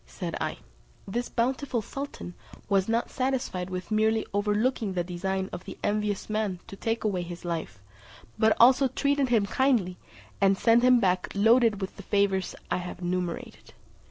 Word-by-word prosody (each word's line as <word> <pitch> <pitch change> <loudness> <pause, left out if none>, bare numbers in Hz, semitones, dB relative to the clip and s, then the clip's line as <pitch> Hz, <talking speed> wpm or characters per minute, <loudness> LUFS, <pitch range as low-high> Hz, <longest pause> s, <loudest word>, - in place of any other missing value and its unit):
said - - -5
I, - - -2 0.5
"this 240 +5 -3
bountiful 255 0 -1
sultan 275 -8 -7 0.3
was 195 0 +2
not 230 +1 0
satisfied 255 -9 -2
with 185 0 -6
merely 220 +1 +2
overlooking 210 +1 0
the 175 -1 0
design 190 +2 -2
of 175 +1 -7
the - - -8
envious 210 -1 -1
man 215 -4 -1
to - - -10
take 225 +3 -2
away 200 -4 0
his 175 0 -8
life, 165 - -4 0.6
but 220 0 +4
also 260 +3 +6
treated 280 0 0
him 225 -4 +3
kindly, 220 -7 +1 0.4
and 195 0 +4
sent 230 +3 +4
him 250 0 +6
back 185 -3 +1
loaded 225 0 +4
with 190 - -5
the - - -8
favours 200 -1 0 0.2
I - - +2
have 180 0 -6
enumerated." 180 -1 -4
205 Hz, 160 wpm, -27 LUFS, 185-235 Hz, 0.6 s, also